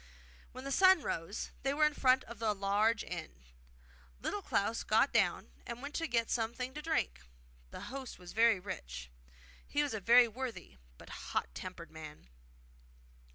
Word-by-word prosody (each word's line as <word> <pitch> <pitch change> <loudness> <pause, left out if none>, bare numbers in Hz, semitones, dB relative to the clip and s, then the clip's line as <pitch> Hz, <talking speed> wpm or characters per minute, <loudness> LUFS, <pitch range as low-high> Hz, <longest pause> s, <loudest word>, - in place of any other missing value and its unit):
When 255 +1 -9
the 275 - -4
sun 375 +1 +6
rose 165 +6 -3
they 275 +1 0
were 305 +1 +5
in 300 - +2
front 260 -2 +4
of 235 -1 -11
a 220 -2 +2
large 205 +3 +2
inn. 65 +1 -7 0.8
Little - - -2
Klaus - - 0
got - - +3
down, - - +2
and 235 - -6
went 285 +4 -4
in 330 - 0
to - - -20
get 230 -1 +1
something 240 +3 -1
to 300 - -6
drink. 65 - -1 0.5
The - - -8
host 265 0 -7
was 180 -1 -11
very 225 -2 +5
rich. - - -7 0.6
He 290 0 +1
was 290 - -2
a 220 - -2
very 235 +4 +7
worthy 230 - -6 0.2
but - - -13
hot 60 - -3
tempered 170 - -8
man. 155 - -10
230 Hz, 170 wpm, -34 LUFS, 180-265 Hz, 0.8 s, very